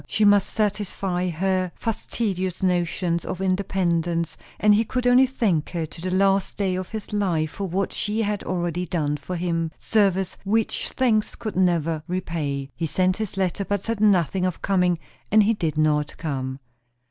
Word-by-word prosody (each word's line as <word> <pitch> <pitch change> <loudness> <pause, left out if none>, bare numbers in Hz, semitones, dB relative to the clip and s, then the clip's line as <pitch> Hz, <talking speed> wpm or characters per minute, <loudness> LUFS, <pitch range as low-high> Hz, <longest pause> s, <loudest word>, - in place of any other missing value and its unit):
She 215 - +2
must 205 -1 +5
satisfy 195 -3 -1
her 185 +1 0
fastidious 195 -5 -2
notions 175 -1 +1
of 185 - -4
independence, 175 -3 0 0.2
and 210 0 +5
he 215 +2 +4
could 250 +2 -2
only 250 +2 +6
thank 210 - 0
her 170 -2 -2
to 165 +1 -11
the 185 - -2
last 195 +1 +2
day 195 -2 0
of 185 0 -4
his 215 -1 -6
life 170 -7 0
for 200 - -4
what 190 +3 -1
she 220 +1 -1
had 205 -1 -1
already 175 0 -2
done 150 -4 0
for 150 +6 -6
him; 165 -2 -1
service 195 -3 +1
which 215 +2 0
thanks 225 -5 +1
could 215 -3 -5
never 165 -4 +2
repay. 150 -6 -3
He 165 - -2
sent 185 +4 +1
this 215 -3 -4
letter, 190 +1 0
but 200 0 -2
said 230 -2 -2
nothing 190 -3 +3
of 185 -2 -2
coming; 180 -3 +2 0.3
and 215 0 +6
he 220 +3 +3
did 160 -7 -2
not 150 -1 +1
come. 130 -4 -3
185 Hz, 170 wpm, -24 LUFS, 170-205 Hz, 0.3 s, only